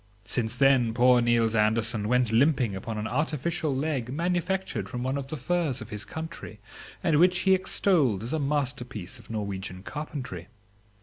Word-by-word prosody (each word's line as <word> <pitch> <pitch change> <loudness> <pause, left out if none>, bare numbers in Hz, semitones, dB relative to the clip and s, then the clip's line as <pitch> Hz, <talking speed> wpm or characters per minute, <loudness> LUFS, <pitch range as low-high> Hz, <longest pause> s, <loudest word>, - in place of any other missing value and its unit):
Since 115 0 -1
then 130 -4 +4
poor 125 0 +5
Niels 115 -1 +2
Andersen 110 0 +2
went 125 -1 +2
limping 120 -3 +3
upon 110 +3 -5
an 105 - -3
artificial 150 +4 -1
leg 135 -4 -2
manufactured 180 +5 -1
from 125 0 -4
one 130 +2 -1
of 140 -1 -4
the 155 - -5
firs 155 -1 0
of 110 - -9
his 105 -1 -4
country, 160 -10 -7 0.4
and 155 -3 +3
which 180 +1 +4
he 190 - +4
extolled 165 - +2
as 120 - -4
a 160 - 0
masterpiece 130 -6 -3
of - - -17
Norwegian 95 -4 -5
carpentry. 130 - -6
125 Hz, 165 wpm, -27 LUFS, 110-155 Hz, 0.4 s, poor